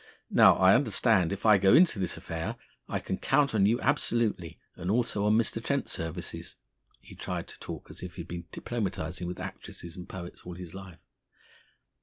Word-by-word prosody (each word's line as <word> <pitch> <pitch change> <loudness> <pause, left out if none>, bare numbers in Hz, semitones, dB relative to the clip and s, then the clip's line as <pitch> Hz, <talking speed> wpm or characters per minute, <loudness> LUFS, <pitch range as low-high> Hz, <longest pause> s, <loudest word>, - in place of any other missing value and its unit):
Now, - - +7
I - - +6
understand 90 -2 +3
if 100 +2 -5
I 105 -2 +7
go 95 0 +6
into 165 - +5
this 90 -3 -1
affair 80 0 -4 0.3
I - - -1
can 95 - -4
count 140 -1 +2
on 100 -2 +4
you 115 +3 +2
absolutely, 115 - 0 0.2
and 90 - -5
also 110 -2 +1
on 105 +1 +4
Mr. 115 0 0
Trent's 140 +1 -1
services." 80 +1 -5 0.4
He - - -15
tried - - -5
to - - -12
talk - - -8
as - - -11
if 90 -1 -8
he 90 - -5
had 85 - -10
been 85 0 -6
diplomatising 90 -6 -4
with 90 - -5
actresses 85 -1 -8
and 90 - -9
poets 90 -1 -8
all 90 0 -8
his 90 -2 -9
life. 95 -2 -10
95 Hz, 190 wpm, -29 LUFS, 85-115 Hz, 0.4 s, Now